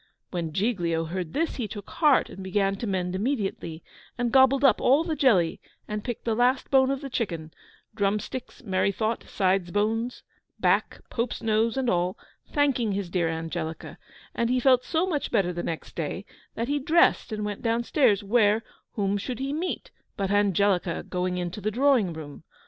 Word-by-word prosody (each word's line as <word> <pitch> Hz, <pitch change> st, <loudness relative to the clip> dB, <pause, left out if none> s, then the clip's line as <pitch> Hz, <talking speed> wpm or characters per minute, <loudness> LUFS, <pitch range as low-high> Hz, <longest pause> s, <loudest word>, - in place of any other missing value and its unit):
When 170 Hz, -3 st, -3 dB
Giglio 170 Hz, -4 st, 0 dB
heard 175 Hz, 0 st, -4 dB
this 330 Hz, +2 st, -1 dB
he 240 Hz, -5 st, -2 dB
took 205 Hz, -1 st, -8 dB
heart, 300 Hz, -5 st, +4 dB
and 190 Hz, -, -9 dB
began 195 Hz, +1 st, +1 dB
to 230 Hz, -, -4 dB
mend 180 Hz, -2 st, -1 dB
immediately; 195 Hz, -, -2 dB, 0.3 s
and 240 Hz, -1 st, 0 dB
gobbled 265 Hz, +1 st, +5 dB
up 260 Hz, -6 st, +5 dB
all 275 Hz, +5 st, +4 dB
the 330 Hz, -2 st, -2 dB
jelly, 195 Hz, -, +3 dB, 0.3 s
and 210 Hz, 0 st, -4 dB
picked 240 Hz, -3 st, -5 dB
the 230 Hz, -, +1 dB
last 245 Hz, +3 st, +1 dB
bone 265 Hz, -1 st, +5 dB
of 275 Hz, 0 st, -1 dB
the 275 Hz, -, -6 dB
chicken 165 Hz, -10 st, -3 dB, 0.4 s
drum 205 Hz, -1 st, +1 dB
sticks, 255 Hz, +4 st, -8 dB
merry 195 Hz, -2 st, +1 dB
thought, 220 Hz, +3 st, -2 dB
sides' 190 Hz, -2 st, +1 dB
bones, 225 Hz, +5 st, -1 dB, 0.4 s
back, -, -, +1 dB
pope's 235 Hz, +1 st, -2 dB
nose, 225 Hz, +2 st, +1 dB
and 265 Hz, -1 st, 0 dB
all 180 Hz, -3 st, +1 dB, 0.3 s
thanking 255 Hz, -7 st, +1 dB
his 195 Hz, -3 st, -3 dB
dear 175 Hz, -3 st, +1 dB
Angelica: 160 Hz, 0 st, -5 dB, 0.3 s
and 235 Hz, 0 st, 0 dB
he 255 Hz, +1 st, +2 dB
felt 255 Hz, 0 st, +4 dB
so 325 Hz, +3 st, +1 dB
much 315 Hz, -6 st, -2 dB
better 190 Hz, -5 st, +1 dB
the 175 Hz, -, -3 dB
next 165 Hz, -2 st, -5 dB
day, 170 Hz, +5 st, -4 dB, 0.3 s
that 230 Hz, -, -2 dB
he 290 Hz, +1 st, 0 dB
dressed 310 Hz, -3 st, +3 dB
and 210 Hz, -1 st, -3 dB
went 205 Hz, -1 st, -4 dB
down 230 Hz, 0 st, +1 dB
stairs 215 Hz, -7 st, +3 dB
where 215 Hz, +1 st, +3 dB, 0.3 s
whom 200 Hz, -1 st, 0 dB
should 245 Hz, +3 st, -4 dB
he 270 Hz, +3 st, -3 dB
meet 345 Hz, +4 st, -3 dB, 0.3 s
but 195 Hz, -2 st, -1 dB
Angelica 200 Hz, -3 st, +2 dB
going 180 Hz, 0 st, -1 dB
into 180 Hz, +3 st, -4 dB
the 210 Hz, -, 0 dB
drawing 245 Hz, -4 st, +3 dB
room? 155 Hz, -3 st, -9 dB
210 Hz, 185 wpm, -26 LUFS, 185-250 Hz, 0.4 s, gobbled